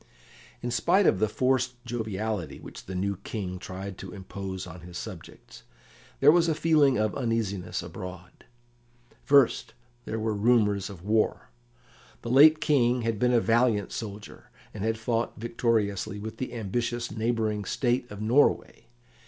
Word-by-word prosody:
In 120 - -2
spite 175 - +3
of 95 - +3
the 110 - +2
forced 125 +2 +1
joviality 110 - -3
which - - -11
the 95 - -5
new 100 +1 -1
King 95 -2 -5
tried 95 +1 -7
to 95 - -8
impose 95 -1 -6
on 90 -1 -10
his 85 +1 -9
subjects, - - -10 0.6
there 145 +2 +8
was 170 0 +4
a 160 - +1
feeling 150 -4 +3
of 110 0 0
uneasiness 115 -7 -2
abroad. 90 -1 -9 0.8
First, 140 -3 +3 0.3
there 110 - -3
were 110 0 -1
rumours 105 -2 +2
of 95 -4 -11
war. 105 - 0 0.7
The 115 - -3
late 155 +4 +7
King 125 -5 +2
had 115 -2 -1
been 125 +2 +3
a 120 - +5
valiant 115 -2 +2
soldier, 105 -2 -8 0.2
and 105 - -5
had 110 0 0
fought 115 +1 -2
victoriously 110 -4 -1
with 110 +2 -7
the 125 -2 -5
ambitious 115 +2 -2
neighbouring 110 -1 -1
State 120 +4 -1
of 105 +1 -7
Norway. 125 +7 +2
110 Hz, 150 wpm, -27 LUFS, 100-120 Hz, 0.8 s, there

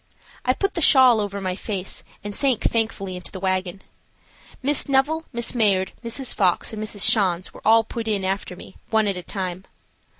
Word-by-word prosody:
I 255 - +2
put 395 +8 -1
the 340 - -2
shawl 255 -6 +6
over 200 -1 -4
my 185 -2 -3
face, 195 -2 -5 0.2
and 205 0 -5
sank 265 -5 +1
thankfully 220 -5 -1
into 180 - -8
the 190 - -7
wagon. 185 0 -2 0.8
Miss 285 +1 +1
Neville, 295 +4 +1
Miss 235 -2 -1
Mayard, 200 -6 +2
Mrs. 235 +3 0
Fox, 185 +2 +1
and 215 - -5
Mrs. 210 -2 -3
Schanz 185 -5 +2
were - - -13
all 225 +1 +5
put 225 0 -6
in 200 -3 0
after 190 -1 -3
me, 190 - -13
one 220 -1 +2
at 200 - 0
a 180 - -5
time. 185 0 -5
210 Hz, 190 wpm, -23 LUFS, 190-235 Hz, 0.8 s, shawl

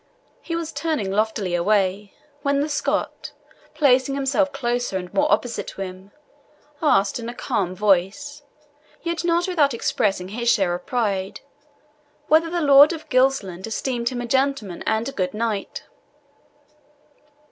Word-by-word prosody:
He 335 - -4
was 330 -1 -3
turning 305 -13 -2
loftily 210 -3 -1
away, 195 +2 0 0.3
when 280 -1 +1
the 295 +2 -1
Scot, 290 - -2 0.4
placing 275 -2 +3
himself 280 +1 +1
closer, 245 -6 -2
and 180 -1 -7
more 295 +1 +2
opposite 245 -1 0
to - - -8
him, 185 +1 -9 0.7
asked, 225 -9 +2
in 230 0 -5
a 240 - -7
calm 195 -10 -2
voice, 210 +10 0 0.6
yet 335 0 -2
not 345 +1 +1
without 295 -8 +2
expressing 195 -5 -1
his 235 +3 -1
share 195 -6 +2
of 175 - -6
pride, 200 -6 -2 0.9
whether 320 +2 +4
the 345 0 -1
Lord 285 +2 +7
of 320 - -9
Gilsland 250 - +1
esteemed 235 +1 -2
him 250 -2 -4
a - - -4
gentleman 265 -7 -1
and 220 +1 0
a - - -3
good 185 -6 -2
knight. 215 -3 -3
240 Hz, 145 wpm, -22 LUFS, 195-285 Hz, 0.9 s, Lord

